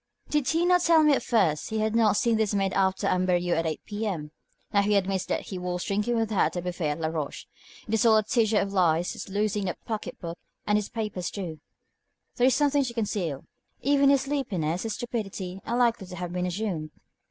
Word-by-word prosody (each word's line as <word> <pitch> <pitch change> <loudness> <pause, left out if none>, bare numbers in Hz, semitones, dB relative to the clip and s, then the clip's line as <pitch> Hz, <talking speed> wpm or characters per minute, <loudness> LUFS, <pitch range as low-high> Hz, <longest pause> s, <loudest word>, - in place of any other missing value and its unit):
Did 295 -3 +1
he 330 +2 +2
not 360 0 +4
tell 330 -2 +5
me 300 -1 +5
at - - +2
first 180 -11 +1
he 220 - -2
had 220 +1 0
not 215 -3 +4
seen 230 0 +2
this 215 -2 +1
maid 195 -1 +1
after 190 -1 +1
Amberieux 180 -1 +2
at 165 0 0
8 155 - -3
P.M.? 200 -8 -3 0.4
Now 200 - +5
he 205 +1 +2
admits 195 -1 +1
that - - -1
he 190 - -6
was 180 0 -3
drinking 210 +4 0
with 225 -1 0
her 200 - 0
at 155 - +3
the 175 - -2
buffet 175 -3 -2
at 150 - -3
Laroche. 160 -2 -3 0.4
It 220 - -4
is 220 - +3
all 225 -2 +6
a 215 - +3
tissue 220 0 +2
of 200 -1 0
lies, 175 -2 +2
his - - -8
losing 205 0 0
the 180 - -3
pocket 220 -2 -5
book 170 -1 -6 0.3
and 210 - +2
his 210 -1 0
papers 210 -6 -3
too. 170 -6 -6 0.8
There 245 - +4
is 260 - +4
something 290 -1 +3
to 235 -2 -5
conceal. 195 - -2 0.4
Even 280 0 +4
his 275 -1 +4
sleepiness, 190 - -2
his 225 -2 -3
stupidity, 195 -6 -4
are 235 - 0
likely 235 -5 +2
to 180 - -8
have 175 0 -5
been 180 0 -1
assumed." 180 -5 -3
205 Hz, 220 wpm, -27 LUFS, 180-230 Hz, 0.8 s, all